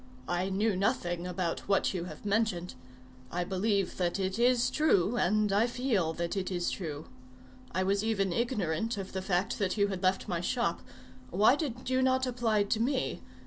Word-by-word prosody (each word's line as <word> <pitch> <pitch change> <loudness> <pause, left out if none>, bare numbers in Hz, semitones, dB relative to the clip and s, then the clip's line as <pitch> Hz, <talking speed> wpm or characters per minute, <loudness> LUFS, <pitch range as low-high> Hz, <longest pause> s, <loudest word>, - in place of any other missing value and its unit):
I 175 +2 0
knew 205 +2 +1
nothing 180 -4 0
about 180 -2 -3
what 200 0 +2
you 175 -2 -3
have 160 +2 -10
mentioned. 200 -4 0 0.6
I 175 +1 -1
believe 195 +1 0
that 180 +1 0
it 190 +2 -1
is 245 +1 +3
true, 240 - +3
and 210 -2 +2
I 215 +4 +4
feel 235 -9 0
that 170 +3 -3
it 190 -2 -2
is 175 -2 -1
true. 155 -5 -5 0.7
I 185 - 0
was 200 +2 +1
even 200 -5 0
ignorant 225 -3 -1
of 195 -1 -6
the 190 - -2
fact 185 0 0
that 195 0 0
you 200 -1 +3
had 190 -2 -4
left 185 0 +1
my 175 -4 -1
shop. 210 -3 0 0.5
Why 210 +8 +5
did 255 -6 -4
you 260 0 +3
not 260 0 +2
apply 235 -4 +1
to 200 +2 -1
me? 260 +3 0
200 Hz, 185 wpm, -30 LUFS, 180-230 Hz, 0.7 s, Why